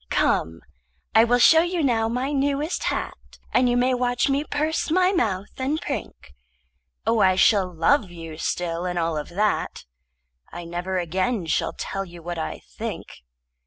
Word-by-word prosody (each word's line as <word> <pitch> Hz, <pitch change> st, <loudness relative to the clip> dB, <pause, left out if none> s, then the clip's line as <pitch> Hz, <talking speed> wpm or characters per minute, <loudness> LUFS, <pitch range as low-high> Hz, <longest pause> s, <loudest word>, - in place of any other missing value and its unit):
Come, 80 Hz, 0 st, +1 dB, 0.5 s
I 220 Hz, -, +7 dB
will 245 Hz, +1 st, +3 dB
show 320 Hz, +6 st, +7 dB
you 350 Hz, -1 st, -1 dB
now 225 Hz, -4 st, +2 dB
my 250 Hz, +4 st, -1 dB
newest 285 Hz, +3 st, -1 dB
hat, -, -, -4 dB, 0.2 s
And 250 Hz, -1 st, +4 dB
you 245 Hz, -, +2 dB
may 255 Hz, +1 st, +2 dB
watch 245 Hz, +1 st, +1 dB
me 275 Hz, +2 st, +1 dB
purse 305 Hz, +2 st, -1 dB
my 365 Hz, +3 st, +3 dB
mouth 210 Hz, -, -1 dB
and 280 Hz, +4 st, 0 dB
prink. 225 Hz, -, -6 dB, 0.7 s
Oh, 230 Hz, -, +2 dB
I 190 Hz, -2 st, +4 dB
shall 190 Hz, -1 st, +4 dB
love 185 Hz, -, +2 dB
you 165 Hz, -2 st, -9 dB
still 170 Hz, 0 st, -2 dB
and 180 Hz, 0 st, -3 dB
all 165 Hz, -1 st, 0 dB
of 150 Hz, -, -4 dB
that. 205 Hz, +4 st, -1 dB, 0.7 s
I 175 Hz, 0 st, -7 dB
never 175 Hz, +2 st, -3 dB
again 185 Hz, +4 st, -1 dB
shall 160 Hz, -, 0 dB
tell 195 Hz, -, -4 dB
you 175 Hz, -3 st, -12 dB
what 175 Hz, 0 st, -4 dB
I 160 Hz, -, -5 dB
think. -, -, -7 dB
215 Hz, 165 wpm, -24 LUFS, 175-275 Hz, 0.7 s, I